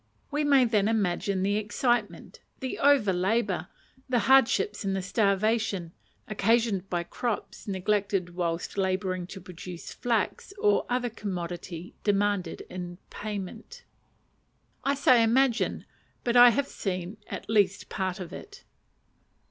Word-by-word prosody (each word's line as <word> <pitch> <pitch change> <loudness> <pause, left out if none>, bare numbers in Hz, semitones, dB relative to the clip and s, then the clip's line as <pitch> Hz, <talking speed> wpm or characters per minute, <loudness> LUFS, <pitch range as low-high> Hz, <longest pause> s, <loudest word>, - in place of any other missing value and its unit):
We 295 +1 0
may 280 -3 +5
then 215 -3 +2
imagine 200 -3 0
the 205 +1 +1
excitement, 215 +1 -1 0.2
the 260 -2 -4
over 275 -9 +4
labour, 190 0 0 0.4
the 250 - +2
hardship, 250 -6 +4
the 195 -2 -2
starvation 200 -2 +1 0.4
(occasioned 215 -2 +1
by 175 -1 -1
crops 230 +5 -4
neglected 195 -2 0
whilst 170 +2 -2
labouring 185 -1 -1
to 195 - -8
produce 180 -1 -9
flax 240 - -1
or 415 -1 +2
other 245 -1 0
commodity 175 -4 -5
demanded 200 -4 0
in 175 -1 -7
payment) 210 - -6 1.0
I 280 +1 +1
say 255 -3 +5
imagine, 240 +1 +2 0.4
but 240 0 0
I 245 0 +10
have 265 +4 +1
seen 185 -2 -4
at - - -6
least 205 -3 +2
part 190 -2 -3
of 180 -1 -7
it. 405 -1 -10
205 Hz, 125 wpm, -28 LUFS, 185-235 Hz, 1.0 s, I